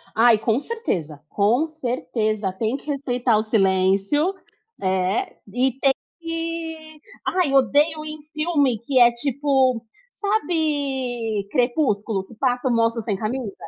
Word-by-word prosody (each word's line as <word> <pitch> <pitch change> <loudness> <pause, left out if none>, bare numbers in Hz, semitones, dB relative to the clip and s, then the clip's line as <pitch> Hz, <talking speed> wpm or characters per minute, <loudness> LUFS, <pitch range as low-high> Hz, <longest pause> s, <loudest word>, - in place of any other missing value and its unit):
Ai, 230 0 +6
com 225 +2 +1
certeza, 175 - -4
com 225 +9 +2
certeza 225 -8 -2
tem 220 +6 -1
que - - -18
respeitar 250 -5 +1
o 215 - +1
silêncio, 195 - +2 0.5
eh, 190 - 0 0.2
e 255 +2 +2
tem 275 -1 +4 0.3
que 330 -2 -5 0.3
ai, 360 -7 +1
odeio 290 +3 +3
em 305 0 -7
filme 300 -7 +1
que 255 +3 +1
é, 240 -1 +7
tipo, 260 -1 +1 0.3
sabe 275 - -1
Crepúsculo? 240 -6 +1
Que 230 - -15
passa 250 +1 0
o - - +2
moço 230 0 +2
sem 210 -2 -2
camisa? 220 0 -3
250 Hz, 125 wpm, -23 LUFS, 220-300 Hz, 0.5 s, é